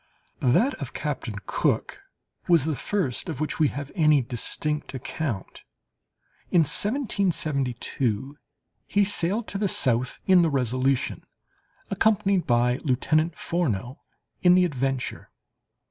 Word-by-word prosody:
That 220 - +3
of - - -6
Captain - - -4
Cook 410 - -1 0.5
was 170 -6 +4
the 155 -2 0
first 140 - -2
of - - -5
which 155 +1 -3
we 155 - +5
have 140 0 -6
any 150 -6 +4
distinct 145 +5 -3
account. 130 - -5 0.9
In 175 - +4
1772 145 - -1 0.5
he 205 - +3
sailed 205 +3 +1
to 195 - -3
the 205 - +1
south 125 -7 +1
in 185 -2 +6
the 165 - +3
Resolution, 130 -1 0 0.7
accompanied 195 -3 +2
by 120 0 +2
Lieutenant 155 +4 0
Furneaux 130 - -2 0.4
in 180 0 +6
the 180 0 +5
Adventure. 135 -4 -3
150 Hz, 115 wpm, -25 LUFS, 130-180 Hz, 0.9 s, in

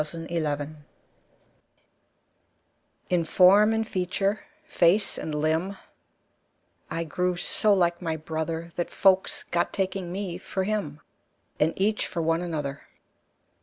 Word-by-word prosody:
Y - - +1
Z 155 +2 -5
The 170 0 -2 0.2
Twins 145 +2 -7 2.4
IN 175 -2 +3
FORM 195 +6 +6
and 225 0 0
feature, 195 +2 -1 0.3
face 195 - +2
and 155 - -4
limb, 160 +6 0 1.1
I 165 - -2
grew 180 +3 -1
so 210 +4 +2
like 175 -2 +1
my 165 -2 -2
brother, 160 +2 -4
That 175 - -1
folks 190 -1 +2
got 170 - -1
taking 190 -2 -2
me 185 -2 -4
for 190 0 -3
him, 185 -8 -3 0.6
And 160 +2 +2
each 210 +2 +1
for 170 - -5
one 165 +1 +1
another. 150 -5 -4
175 Hz, 130 wpm, -26 LUFS, 160-195 Hz, 2.4 s, FORM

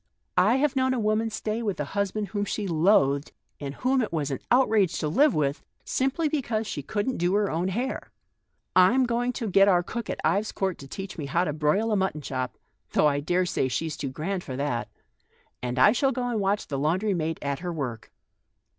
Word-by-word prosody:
I - - +4
have 285 +1 +1
known 260 0 +2
a - - -1
woman 215 +1 +1
stay 220 +1 -3
with 205 -7 -2
a 150 - -1
husband 200 +1 -1
whom 205 -1 -1
she 205 +1 -3
loathed, 155 -5 +3 0.3
and 140 -1 -5
whom 260 +1 +1
it 220 - -2
was 150 -4 -1
an 135 - -2
out 255 +2 +5
rage 195 -7 +2
to 155 - -1
live 275 - +4
with, 145 -1 0 0.2
simply 270 +5 0
because 245 -7 -1
she 160 -8 -4
couldn't 205 - -2
do 175 +3 +1
her 205 -1 +1
own 170 +3 0
hair. 240 +8 -3 0.7
I'm 230 +9 +5
going 245 +1 0
to 235 -3 -3
get 195 0 +5
our 180 -3 +4
cook 235 +5 -5
at - - -3
Ives 205 +2 +1
Court 190 -2 -2
to 135 - -10
teach 195 +4 -7
me 145 - -4
how 170 +6 +1
to 150 - -1
broil 155 +10 +1
a - - +3
mutton 190 -6 0
chop, 130 -2 -4 0.4
though - - +4
I 145 -1 +3
daresay 175 -1 0
she's 160 +4 -2
too 140 - -4
grand 175 +7 -3
for 130 - -6
that; 125 -5 -2 0.7
and 125 0 -3
I 170 +11 +7
shall 270 +4 +2
go 250 -1 -2
and 230 -3 -1
watch 200 +1 0
the 140 -2 -3
laundry 185 +8 +1
maid 165 -2 -1
at 140 -1 -2
her 180 0 -4
work." 125 -9 -5
190 Hz, 215 wpm, -26 LUFS, 150-225 Hz, 0.7 s, I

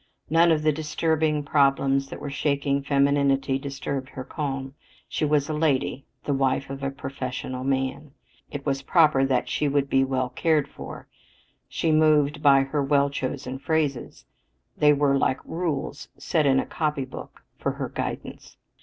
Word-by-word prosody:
None 165 +1 +5
of 155 -1 +2
the 155 - +4
disturbing 155 0 0
problems 135 -1 +2
that - - -7
were 145 - -6
shaking 140 -1 0
femininity 140 -1 +2
disturbed 135 -1 -4
her 130 - -7
calm. 135 -2 -4 0.3
She - - -1
was 145 -1 +2
"a 155 - -2
lady," 145 -3 0 0.2
the 145 - -1
"wife 135 0 0
of 135 0 -6
a 135 - -1
professional 130 -2 -5
man." 135 +2 -1 0.4
It 145 -1 -7
was 135 -2 0
proper 150 -2 +4
that 130 -2 +1
she 150 - 0
should 140 -1 0
"be 135 0 +4
well 130 -1 -1
cared 150 +2 +1
for." - - -10 0.6
She 165 - 0
moved 150 -1 +3
by 140 -2 +6
her 140 +2 -1
well 140 0 +2
chosen 130 -1 -4
phrases; 145 -4 -2 0.5
they 150 0 +5
were 140 -1 +3
like 130 - +1
rules 160 -4 -3
set 155 -4 +1
in 135 -1 +4
a - - -1
copybook 150 -5 -4 0.2
for - - -1
her - - -4
guidance. - - -6
140 Hz, 160 wpm, -25 LUFS, 135-150 Hz, 0.6 s, by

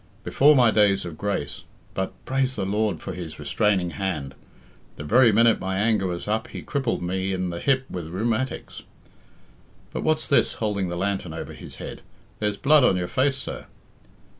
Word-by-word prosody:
Before 150 +2 +5
my 120 -4 +5
days 100 -3 +3
of 85 -2 -6
grace 100 -6 -3 0.3
but, 95 0 -2
praise 130 0 0
the - - -2
Lord 105 +2 0
for - - -6
His 85 -3 -7
restraining 90 +4 +1
hand, 85 -10 -3 0.6
the - - -7
very 120 +8 +5
minute 115 +1 +4
my 95 0 -2
anger 105 -2 +2
was 90 +1 -4
up 110 +1 -1
He - - -8
crippled 130 -9 -1
me 95 +2 -1
in 90 -1 -2
the 85 - -5
hip 135 +2 +1
with 85 -3 -6
rheumatics. 115 +7 -2 1.1
But - - -2
what's 155 0 +1
this?" 140 - +3
holding 100 -4 -1
the 85 - -3
lantern 95 -3 -2
over - - -6
his - - -9
head; - - -8 0.4
"there's 105 -1 -1
blood 150 +3 +5
on 95 -7 +4
your 90 -1 -2
face, 135 +5 +1
sir?" 130 - -7
100 Hz, 180 wpm, -24 LUFS, 90-120 Hz, 1.1 s, Before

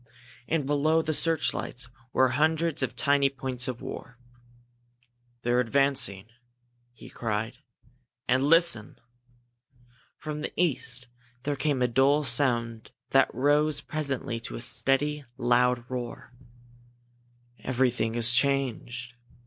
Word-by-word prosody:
And 160 -4 0
below 155 +3 +2
the 155 - -1
searchlights 155 -6 0 0.2
were 130 0 +3
hundreds 155 +4 +1
of 130 -2 -2
tiny 140 -1 +3
points 130 -1 -2
of 125 -2 -5
fire. 125 - -8 1.3
"They're 120 +1 +2
advancing!" 125 -6 +1 0.7
he 120 - -14
cried. 115 +2 -4 0.7
"And 130 +1 +2
listen!" 165 -8 +3 1.2
From 150 -1 -6
the - - -4
east 130 -7 0 0.4
there 145 +1 -1
came 140 -3 0
a - - +3
dull 135 +5 +3
sound 120 -6 0 0.2
that 135 0 +4
rose 145 +3 +2
presently 140 -5 -4
to 115 - -7
a - - -3
steady, 145 +4 +2
loud 120 -1 +2
roar. 125 -1 -6 1.3
"Everything 125 -3 0
has 120 0 +4
changed!" 120 -2 -1
130 Hz, 110 wpm, -27 LUFS, 120-145 Hz, 1.3 s, that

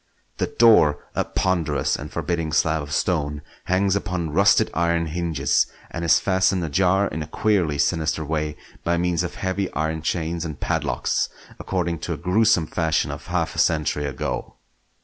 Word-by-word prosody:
The - - 0
door, 105 -11 +5 0.2
a - - 0
ponderous 80 -7 0
and - - -7
forbidding 85 -3 -2
slab 80 -1 +2
of 70 0 -8
stone, 75 -3 -1 0.2
hangs 95 +1 +2
upon 90 -5 -2
rusted 100 +6 +4
iron 85 0 +1
hinges, 80 -3 0 0.2
and 85 - -4
is 85 0 +5
fastened 95 -1 +1
ajar 95 +5 +2
in 80 - -4
a 75 - -5
queerly 90 -9 +1
sinister 80 0 0
way 75 0 -2 0.3
by 85 0 +1
means 85 -1 +1
of 90 0 -4
heavy 95 0 -2
iron 80 +1 -1
chains 85 +1 -2
and 75 -4 -6
padlocks, - - -1 0.3
according 85 -3 -2
to 85 +1 -3
a - - -5
gruesome 90 +1 +3
fashion 80 0 0
of - - -8
half - - -1
a - - -3
century 75 -2 +1
ago. 70 -2 -4
85 Hz, 165 wpm, -23 LUFS, 80-90 Hz, 0.3 s, door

